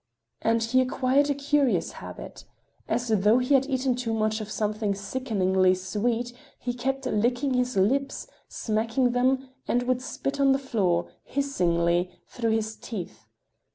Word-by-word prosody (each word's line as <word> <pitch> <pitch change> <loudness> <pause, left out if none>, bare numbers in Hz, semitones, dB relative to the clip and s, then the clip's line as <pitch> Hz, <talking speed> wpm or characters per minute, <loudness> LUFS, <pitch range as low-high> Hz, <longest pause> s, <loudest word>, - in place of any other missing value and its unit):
And 230 0 +2
he 255 +3 +3
acquired 260 +2 +2
a 285 - +1
curious 285 -2 +1
habit; - - -9 0.4
as 235 +1 -1
though 215 +1 +4
he 255 +3 +1
had 270 0 +4
eaten 260 -1 +1
too 240 -2 -2
much 215 0 0
of 215 - -6
something 210 -1 -1
sickeningly 195 -4 +1
sweet, 230 +6 -2 0.2
he 245 - -3
kept 270 +2 -2
licking 245 +5 +1
his 250 -2 0
lips, 270 +9 +1 0.2
smacking 230 +3 0
them, 260 +2 +1 0.2
and 245 +1 +1
would 255 0 0
spit 275 +2 -4
on 275 -1 +5
the - - +2
floor, 195 -10 0
hissingly, 175 -10 +1 0.2
through 230 -2 -2
his 220 0 0
teeth. 200 -8 -7
240 Hz, 150 wpm, -26 LUFS, 215-260 Hz, 0.4 s, on